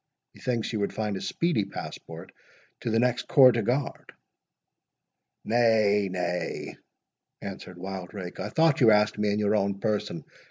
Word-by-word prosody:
"Methinks 120 -2 -3
you 110 - -1
would 100 - -2
find 105 -2 -2
a 95 - -5
speedy 170 -11 0
passport - - -8 0.5
to - - -3
the 110 - +1
next 125 +1 +1
corps 135 -6 +7
de 115 - 0
garde." 125 +6 -2 1.3
"Nay, 110 -4 +3
nay," 90 -1 -3 0.6
answered 95 -2 -8
Wildrake, 95 0 -7
"I - - -3
thought 160 -3 +3
you 115 - +7
asked 105 0 +3
me 105 0 +1
in 100 - 0
your 105 0 +2
own 100 -1 0
person. 105 -6 -2
105 Hz, 150 wpm, -27 LUFS, 100-115 Hz, 1.3 s, corps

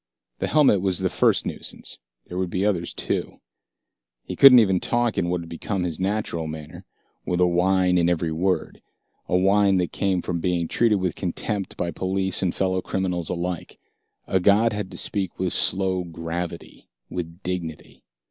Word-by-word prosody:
The - - -1
helmet 140 -11 +4
was 95 -2 +1
the - - -1
first - - +2
nuisance. - - -4 0.3
There 90 - -5
would 95 -1 -1
be 95 +3 -1
others 90 -5 0
too. - - -3 0.8
He - - -6
couldn't 135 -2 +9
even 95 -6 +4
talk 120 +1 0
in 85 - 0
what 90 -1 -1
had 85 - -10
become 90 +3 -3
his 85 -2 -2
natural 95 -4 -2
manner, 75 -1 -8 0.4
with 90 - -1
a 90 - +5
whine 90 +1 +2
in 85 0 +3
every 85 -1 0
word, 90 +4 -1 0.5
a 90 - +3
whine 100 +1 +3
that 90 -2 0
came 95 -3 0
from 85 -1 -2
being 85 -1 0
treated 115 +2 +2
with 90 -4 -1
contempt 100 +2 -3
by 85 - -2
police 95 +2 -1
and 90 -2 0
fellow 95 -1 0
criminals 90 -4 -2
alike. 90 -1 -4 0.5
A 95 - +1
god 105 +5 +4
had 105 -2 -4
to 90 - -9
speak 95 0 -2
with 90 -1 -1
slow 95 -1 +1
gravity, 85 0 -6 0.2
with 85 +1 -6
dignity. 85 -4 -5
90 Hz, 175 wpm, -24 LUFS, 85-95 Hz, 0.8 s, couldn't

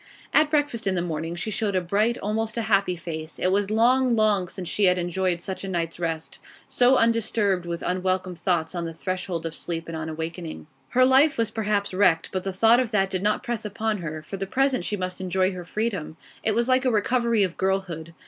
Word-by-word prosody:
At 305 -1 +5
breakfast 290 -8 0
in 190 - +1
the 175 - 0
morning 165 0 -3
she 175 +6 -3
showed 205 -2 -1
a - - +4
bright, 210 +7 +1
almost 220 +2 -2
a 230 - 0
happy 200 -4 +2
face. 160 -2 -6
It 185 - +1
was 200 +1 +1
long, 245 +3 +3
long 210 -4 +2
since 180 0 -7
she 205 - +2
had 180 0 +4
enjoyed 175 0 -1
such 190 +2 -4
a - - -4
night's 170 -3 -3
rest, 165 -2 -4 0.3
so 250 +1 +4
undisturbed 220 -6 +1
with 170 0 -4
unwelcome 185 0 -1
thoughts 170 -1 -1
on 170 -1 -3
the 165 -1 -6
threshold 180 -2 -3
of 165 - -3
sleep 165 0 -3
and 165 - -5
on 160 0 -4
awaking. 160 +1 -6 0.2
Her 255 +1 +4
life 270 +3 +5
was 230 -2 0
perhaps 205 -3 -1
wrecked, 185 -4 +3
but 185 -1 -2
the 195 - -2
thought 225 +5 +5
of 255 -3 0
that 195 -3 +1
did 185 - -1
not 210 +1 +1
press 235 -2 -3
upon 215 0 -2
her; 155 -2 -5
for 195 - -6
the 195 0 -4
present 270 +4 +1
she 210 - -1
must 185 0 -4
enjoy 185 +1 +1
her 180 -1 -7
freedom. 195 -5 -3 0.3
It 215 -1 +1
was 235 +1 +1
like 255 0 +3
a 260 - +3
recovery 235 0 +2
of 185 -3 -1
girlhood. 180 -4 -2
190 Hz, 225 wpm, -25 LUFS, 175-225 Hz, 0.3 s, At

